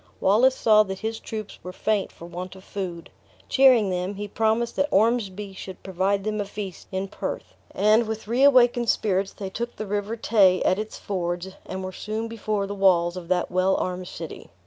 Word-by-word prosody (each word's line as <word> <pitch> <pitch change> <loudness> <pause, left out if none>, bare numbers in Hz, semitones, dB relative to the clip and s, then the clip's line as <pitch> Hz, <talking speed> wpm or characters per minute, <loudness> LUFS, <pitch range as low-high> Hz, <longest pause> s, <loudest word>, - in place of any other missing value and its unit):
Wallace 240 +7 +4
saw 215 -3 +5
that 190 -2 -3
his 225 0 -3
troops 215 -2 -7
were 180 - -7
faint 210 +1 -1
for 170 - -12
want 180 +2 -7
of 190 - -13
food; 180 -5 -6 0.4
cheering 255 -7 +5
them, 180 +2 -2
he 205 +1 -5
promised 225 +3 0
that 285 - +2
Ormsby 210 -3 +1
should 190 -1 -9
provide 195 +1 0
them 215 0 -1
a - - -3
feast 200 -3 -7
in 190 +1 -2
Perth; - - -5 0.2
and, 215 +3 +3
with 220 -1 -5
reawakened 245 -1 +4
spirits, 195 -2 +1
they 195 -2 -6
took 235 +4 -4
the 215 - -5
River 205 +2 -2
Tay 200 -5 +4
at 185 - +2
its 215 0 -5
fords, 175 -1 -3 0.2
and 190 0 -5
were 185 - -4
soon 215 +4 -4
before 215 -3 -2
the 200 - -5
walls 180 -3 +3
of 180 -2 -7
that 180 0 0
well 185 +1 +2
armed 180 0 -3
city. - - -8
200 Hz, 190 wpm, -25 LUFS, 185-220 Hz, 0.4 s, saw